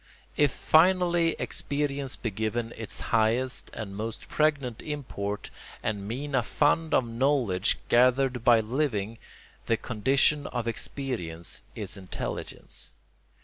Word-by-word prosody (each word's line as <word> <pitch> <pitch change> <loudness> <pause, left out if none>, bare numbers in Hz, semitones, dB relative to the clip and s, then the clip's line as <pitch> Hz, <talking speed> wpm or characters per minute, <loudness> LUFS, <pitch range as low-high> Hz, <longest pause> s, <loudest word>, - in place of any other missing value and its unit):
If 145 -1 +4
finally 170 +2 +4
experience 140 -2 -1
be 115 - -3
given 110 +3 -2
its 110 -2 -4
highest 115 +3 +2
and 100 -3 -6
most 110 +2 -5
pregnant 145 -6 +1
import 105 -9 -4 0.3
and 100 -2 -2
mean 135 +6 -4
a 130 - +4
fund 155 +6 +1
of 125 - +3
knowledge 115 -5 +2
gathered 125 0 +3
by 120 -2 +6
living, 115 -3 -1 0.5
the 115 - +3
condition 135 +7 +2
of 120 -2 -3
experience 110 - -3
is 105 -1 -4
intelligence. 95 -2 -6
120 Hz, 115 wpm, -28 LUFS, 110-145 Hz, 0.5 s, by